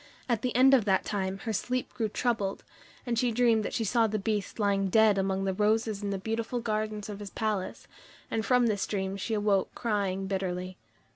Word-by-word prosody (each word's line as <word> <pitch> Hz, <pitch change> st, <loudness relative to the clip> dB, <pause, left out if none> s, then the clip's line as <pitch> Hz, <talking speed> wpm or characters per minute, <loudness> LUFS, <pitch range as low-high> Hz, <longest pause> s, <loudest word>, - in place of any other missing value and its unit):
At 235 Hz, -4 st, 0 dB
the 250 Hz, -2 st, -2 dB
end 265 Hz, +2 st, +6 dB
of 245 Hz, -6 st, +5 dB
that 190 Hz, -2 st, +2 dB
time 195 Hz, -2 st, -2 dB
her 225 Hz, -, -2 dB
sleep 250 Hz, +5 st, -2 dB
grew 225 Hz, -3 st, -1 dB
troubled, 210 Hz, -4 st, -1 dB, 0.4 s
and 235 Hz, -2 st, 0 dB
she 245 Hz, -1 st, +2 dB
dreamed 230 Hz, -2 st, +3 dB
that -, -, -4 dB
She 230 Hz, -, 0 dB
saw 225 Hz, +2 st, +2 dB
the 215 Hz, 0 st, -1 dB
Beast 205 Hz, -1 st, -2 dB
lying 200 Hz, -2 st, +1 dB
dead 215 Hz, 0 st, +5 dB
among 195 Hz, 0 st, 0 dB
the 190 Hz, -1 st, 0 dB
roses 215 Hz, +1 st, +1 dB
in 205 Hz, -, -2 dB
the 195 Hz, -, -1 dB
beautiful 225 Hz, +4 st, -2 dB
gardens 215 Hz, -2 st, -2 dB
of 205 Hz, -1 st, -7 dB
his 205 Hz, -1 st, -7 dB
palace; 210 Hz, -3 st, -3 dB, 0.4 s
and 220 Hz, -, 0 dB
from 250 Hz, +1 st, +3 dB
this 210 Hz, -3 st, 0 dB
dream 190 Hz, -1 st, -2 dB
she 220 Hz, +3 st, -2 dB
awoke 205 Hz, -2 st, +1 dB
crying 200 Hz, -4 st, -1 dB
bitterly. 185 Hz, -1 st, -3 dB
210 Hz, 205 wpm, -29 LUFS, 195-225 Hz, 0.4 s, end